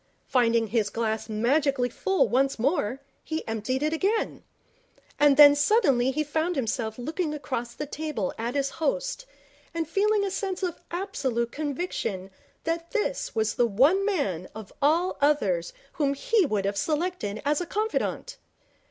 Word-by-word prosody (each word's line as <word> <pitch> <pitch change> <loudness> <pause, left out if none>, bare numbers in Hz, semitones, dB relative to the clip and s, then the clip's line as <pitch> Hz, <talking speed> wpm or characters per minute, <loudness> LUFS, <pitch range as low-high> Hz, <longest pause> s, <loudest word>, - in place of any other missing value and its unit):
Finding 230 -3 +2
his 220 -2 +1
glass 220 0 -2
magically 255 +4 +1
full 385 +10 +1
once 270 +2 +1
more, 270 -1 0 0.2
he 315 0 -4
emptied 225 +5 -2
it 305 +1 +1
again. 400 +7 0 0.8
And 290 -1 +5
then 290 -1 +10
suddenly 290 - +3
he 305 +3 0
found 315 +4 -1
himself 225 -4 -2
looking 305 +5 -2
across 240 -5 -4
the 295 - -4
table 295 -9 -3
at 235 +4 -4
his 275 -1 0
Host, - - -2 0.5
and 330 -2 -1
feeling 405 +4 +2
a 390 - -2
sense 385 -1 -3
of 355 -3 -2
absolute 275 - -2
conviction 285 - -3 0.3
that 335 0 -2
this 460 - -2
was 220 -1 +1
the 240 - +2
one 280 - +4
man 205 - -1
of 220 -3 -9
all 330 +6 +2
others 200 - +2 0.2
whom 280 -2 0
he 400 +4 +2
would 205 -5 -1
have 200 0 -1
selected 305 - -1
as 295 +3 +2
a 350 - -4
confidant. 435 +2 -2
285 Hz, 150 wpm, -26 LUFS, 235-345 Hz, 0.8 s, then